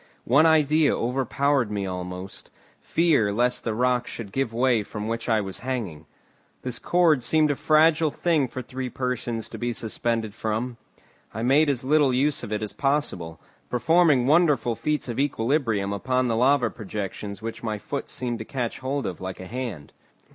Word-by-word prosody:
One 145 +7 +5
idea 155 -1 +3
overpowered 135 +1 0
me 100 -2 -2
almost, 90 +1 -6 0.3
fear 155 -11 +2
lest 120 +4 +1
the 115 -2 -2
rock 125 +1 +1
should 105 -4 -7
give 135 +1 -1
way 120 -1 +2
from 105 +1 -6
which 115 +1 -3
I 110 -2 +3
was 95 -2 -5
hanging. 105 - -4 0.6
This 125 -2 -3
cord 170 -6 +3
seemed 155 +4 +2
a - - -1
fragile 155 +2 +4
thing 155 -3 +1
for 130 +1 -6
three 130 +1 -5
persons 125 -3 -3
to - - -8
be 120 0 -1
suspended 115 -1 -2
from. 110 +3 -3 0.6
I 110 - -3
made 145 +5 +4
as 135 -2 0
little 140 -1 +3
use 140 +3 +1
of - - -7
it 105 0 -1
as 105 - -4
possible, 135 - -1 0.3
performing 145 +1 +3
wonderful 145 -6 +3
feats 150 +5 -2
of 120 +1 -4
equilibrium 115 -7 0
upon 130 +5 0
the 115 - 0
lava 130 +3 +3
projections 105 -1 -6
which 115 0 -5
my 110 -2 -2
foot 140 +7 -5
seemed 120 -2 -3
to - - -4
catch 125 -3 -3
hold 135 +1 -2
of 90 - -5
like 95 0 -5
a 95 - -7
hand. 110 - -6
125 Hz, 175 wpm, -25 LUFS, 110-140 Hz, 0.6 s, One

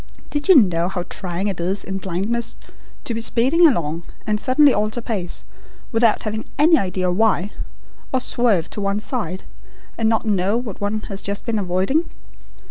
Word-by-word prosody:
Did 295 +5 -2
you 375 - +9
know 180 - +4
how 180 -2 -3
trying 185 +1 -3
it 195 -3 -3
is 190 +3 0
in 195 0 -4
blindness 195 +6 -2 0.5
to 235 - -3
be 230 - -3
speeding 265 +9 +4
along 165 - 0 0.2
and 210 -1 0
suddenly 270 +3 +5
alter 215 +3 0
pace 205 -7 -4 0.5
without 225 -2 +3
having 215 0 -3
any 315 +4 +6
idea 185 - 0
why, 205 0 +1 0.6
or 260 - +2
swerve 235 -9 +1
to 210 - -4
one 200 +1 0
side, 210 -6 -3 0.6
and 220 -1 +3
not 225 0 +1
know 200 0 +1
what 230 -6 -6
one 210 +1 -1
has 195 -2 -5
just 200 0 -4
been 230 -3 0
avoiding? 195 - 0
210 Hz, 170 wpm, -21 LUFS, 190-235 Hz, 0.6 s, you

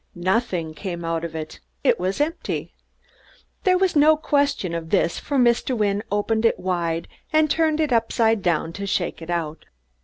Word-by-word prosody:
Nothing 180 -3 -1
came 170 -1 -5
out 165 0 -1
of 165 -1 -5
it 155 -1 -6 0.2
it - - +3
was 185 +5 -1
empty! 310 +3 -2 0.9
There 370 -1 +5
was 370 -2 +1
no 305 +1 +6
question 285 - 0
of 165 -1 -4
this, 170 -3 +1
for 285 - -2
Mr. 245 0 +2
Wynne 205 -1 +1
opened 220 +2 0
it 230 - +3
wide 170 -3 -1 0.2
and 310 -1 +3
turned 315 -1 +2
it 300 -5 +1
upside 225 -1 +2
down 165 -2 0
to 200 +1 -5
shake 175 -3 -1
it 165 - -9
out. 165 -3 -3
200 Hz, 175 wpm, -23 LUFS, 170-280 Hz, 0.9 s, no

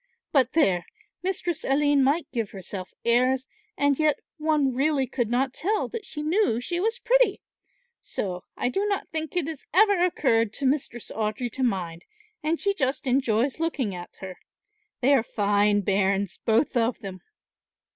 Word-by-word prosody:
But 260 -4 +3
there, 190 - +2 0.3
Mistress 350 -3 -2
Aline 285 0 +3
might 290 +5 +2
give 230 -5 -2
herself 190 -1 -7
airs, 255 +2 +3 0.3
and 285 0 +2
yet 305 -2 +3 0.2
one 300 -4 +1
really 275 +1 +1
could 240 -2 -2
not 255 +2 +1
tell 415 +8 0
that 450 -4 -6
she 300 -1 -4
knew 315 - +2
she 345 +8 -3
was 450 +5 0
pretty; - - +3 0.6
so 180 -3 -4
I 245 - 0
do 390 +10 0
not 400 -2 -2
think 320 +2 -4
it 330 -4 0
has 315 -4 -6
ever 405 -2 +5
occurred 230 - +2
to 280 - -3
Mistress 260 -4 -1
Audry 220 +3 -2
to 265 - -6
mind 180 -8 -1 0.4
and 320 +2 0
she 400 - +1
just 275 -8 -1
enjoys 255 0 +1
looking 290 - -1
at 175 -1 -9
her. 185 -2 -8 0.6
They 270 +3 +4
are 270 - +5
fine 205 -1 +2
bairns 195 0 0
both 230 +5 +2
of 235 0 +1
them." 190 -3 -7
265 Hz, 165 wpm, -26 LUFS, 220-315 Hz, 0.6 s, ever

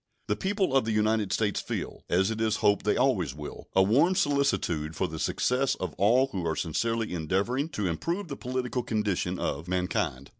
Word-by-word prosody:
The - - 0
people 190 -7 0
of 135 - +4
the 110 - -1
United 110 -1 +1
States 105 0 +1
feel, - - -5
as 95 +4 +2
it 110 0 -3
is 110 -1 +2
hoped 100 0 +3
they 105 - +2
always 95 - +1
will, 75 -1 -8
a 95 - +6
warm 140 - +4
solicitude 140 - +1
for 95 - 0
the 80 -1 -7
success 130 +9 +1
of 90 -4 -4
all 125 +7 +4
who 95 -4 -3
are 80 - 0
sincerely 115 +7 -1
endeavoring 100 - 0
to 105 -10 -3
improve 170 - -2
the 140 - -5
political 125 -1 -2
condition 100 -5 -1
of 75 +1 -3
mankind. 90 -7 -1
105 Hz, 190 wpm, -28 LUFS, 90-130 Hz, -, a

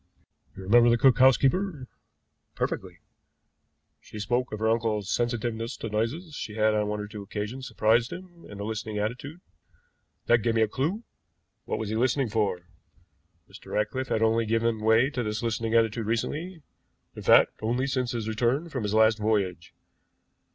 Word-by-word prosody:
You 95 - -8
remember 120 +5 +5
the 120 - +4
cook 130 +2 +4
housekeeper?" 135 +4 +3 0.7
"Perfectly." - - -3 1.0
"She - - -12
spoke 120 +4 -1
of 110 - -4
her 110 +1 0
uncle's 110 -3 0
sensitiveness 120 0 -2
to 115 - -5
noises; 125 - -2
she 110 -6 -6
had 110 0 +2
on 105 -1 0
one 105 0 -2
or 105 - -5
two 105 0 -8
occasions 105 +6 -5
surprised 115 +1 +2
him 180 -2 -10
in 105 - -9
a - - -4
listening 110 0 -4
attitude. 125 +10 -4 0.8
That 120 0 +4
gave 115 +1 0
me 110 - +4
a - - +1
clew. 155 - -2 0.6
What - - -2
was 110 - -4
he 110 - -2
listening 130 +2 +1
for? 100 -5 0 0.9
Mr. - - -12
Ratcliffe 130 +5 -1
had 110 - 0
only 115 0 +2
given 115 0 +1
way 110 +5 +3
to 125 - -2
this 105 0 -3
listening 115 0 -1
attitude 115 -1 +2
recently; 155 +9 -3 0.5
in - - -8
fact, - - +6
only 120 +4 0
since 130 -2 -1
his 115 -3 -3
return 120 +9 0
from 130 -5 -4
his 105 0 -2
last 110 0 +4
voyage. 100 -5 -1
115 Hz, 170 wpm, -27 LUFS, 110-130 Hz, 1.0 s, fact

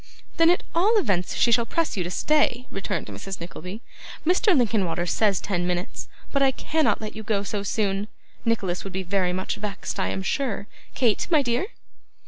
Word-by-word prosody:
'Then 330 -1 +6
at 355 - +3
all 410 +7 +4
events 195 - +1
she 235 - +3
shall 235 +1 +5
press 330 +7 -1
you 185 - 0
to 175 - -4
stay,' 255 +2 +2
returned 195 - -3
Mrs. 195 -1 -6
Nickleby. 180 +4 -7 0.4
'Mr. 360 +1 +4
Linkinwater 195 -8 +1
says 200 +1 +2
ten 175 -3 -1
minutes, 180 +3 -3 0.2
but 280 - +1
I 270 - +6
cannot 310 +4 +1
let 215 0 -5
you 220 - -5
go 210 -2 0
so 205 0 -2
soon; 200 0 0 0.4
Nicholas 195 -6 0
would 195 - -7
be 190 +1 -2
very 185 -1 +1
much 185 +1 -2
vexed, 205 -1 -4
I - - +1
am 190 - -2
sure. 235 -2 -1 0.3
Kate, 235 -5 +2
my 310 -4 +4
dear! 245 +9 0
210 Hz, 185 wpm, -25 LUFS, 190-265 Hz, 0.4 s, Then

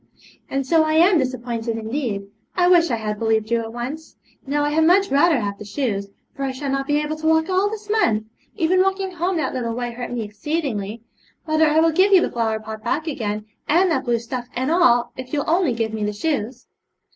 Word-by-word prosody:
'And 275 0 -1
so 320 +4 +4
I 310 0 0
am 340 +2 +5
disappointed, 240 -3 -2
indeed. 225 -2 -3 0.3
I 355 -1 +3
wish 345 -2 +5
I 235 - +1
had 210 -2 -4
believed 220 -1 0
you 235 -1 +2
at 225 0 -6
once. 260 +7 -6 0.3
Now 290 +1 0
I 295 - 0
had 320 +2 +3
much 385 +2 +4
rather 290 +1 +4
have 200 -2 -4
the - - -7
shoes, 205 -2 -2 0.3
for - - -8
I 270 - -1
shall 270 +1 -4
not 275 0 -1
be 290 0 +2
able 300 +1 -2
to 315 0 -3
walk 320 +2 +3
all 380 +2 +2
this 425 -1 -7
month; 225 - +2 0.3
even 360 +3 +2
walking 385 0 0
home 355 +1 -1
that 315 - -1
little 235 -2 -2
way 245 0 -3
hurt 245 +1 -6
me 240 -2 -2
exceedingly. 215 -1 -3 0.4
Mother, 310 0 +3
I 305 +1 +3
will 330 0 +4
give 380 +5 +4
you 370 - +7
the - - -1
flower 225 -2 -1
pot 220 0 -8
back 295 +7 -1
again, 215 -9 -3 0.2
and 355 +3 +3
that 320 - 0
blue 240 -1 +2
stuff 240 +1 -5
and 260 +4 -1
all, 245 -9 +4
if 255 +1 -8
you'll 290 -1 -1
only 335 -3 +2
give 225 -1 -2
me 215 -1 -3
the 210 0 -1
shoes.' 250 -1 -3
270 Hz, 225 wpm, -22 LUFS, 225-320 Hz, 0.4 s, you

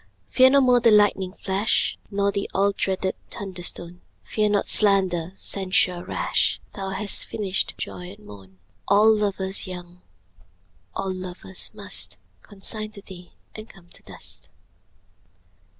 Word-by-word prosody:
Fear 260 0 +7
no 280 +1 +5
more 250 -2 +5
the 230 - +5
lightning 205 -3 +4
flash 200 +2 +1
Nor 200 0 +1
the 200 0 -3
all 200 +1 +3
dreaded 190 -1 -1 0.2
thunder 190 -3 -6
stone; 175 0 -2 0.2
Fear 210 -1 0
not 205 -1 +1
slander, 190 -5 +2
censure 185 -2 +1
rash; - - +1
Thou 195 -1 -4
hast 195 +2 -2
finished 195 -3 -1
joy 180 0 -6
and 210 +2 -13
moan: 95 -2 -13 0.3
All 215 +2 +6
lovers 195 -2 -1
young, 180 -1 -9 0.9
all 190 -1 -2
lovers 180 - -4
must - - -3 0.2
Consign 215 - -5
to 200 -2 -11
thee, 180 -3 -13 0.2
and 215 +1 -9
come 175 -3 -18
to - - -14
dust. - - -10
195 Hz, 135 wpm, -24 LUFS, 180-210 Hz, 0.9 s, Fear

